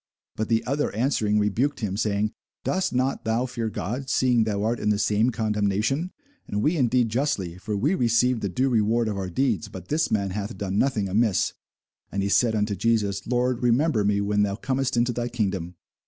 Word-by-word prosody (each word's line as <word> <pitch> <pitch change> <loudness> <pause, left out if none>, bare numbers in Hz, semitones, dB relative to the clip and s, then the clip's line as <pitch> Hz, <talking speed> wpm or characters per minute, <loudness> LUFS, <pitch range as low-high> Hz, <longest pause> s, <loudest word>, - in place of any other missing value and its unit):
But 110 0 -3
the 115 -1 +1
other 140 +3 0
answering 110 -3 +1
rebuked 115 +8 0
him, 100 -3 -2
saying, 105 0 0 0.3
Dost 185 0 0
not 130 +2 0
thou 115 +3 0
fear 120 -3 -3
God, 125 +6 -4
seeing 120 -3 +3
thou 105 -2 -1
art 115 +2 0
in - - 0
the 105 - +2
same 105 +3 +2
condemnation? 110 - 0 0.4
And 105 +1 -2
we 155 +4 +2
indeed 125 -4 +2
justly; 105 - -1
for 105 +2 -3
we 140 - +1
receive 125 - +2
the 100 - -2
due 130 +9 0
reward 115 0 +2
of 105 -2 -2
our 95 -1 -3
deeds: 115 +1 0
but 95 -3 -10
this 160 +2 +1
man 100 -3 0
hath 100 +1 -4
done 100 0 -2
nothing 115 -7 +1
amiss. 105 +1 +1 0.6
And 100 0 -1
he 100 - 0
said 110 +4 +3
unto 105 -1 0
Jesus, 100 -3 0
Lord, 125 0 0
remember 125 -1 +2
me 100 0 +2
when 105 0 +1
thou 100 -1 +1
comest 130 +2 -1
into 120 +1 +2
thy 120 +1 -2
kingdom. 95 -7 -2
110 Hz, 200 wpm, -25 LUFS, 100-125 Hz, 0.6 s, seeing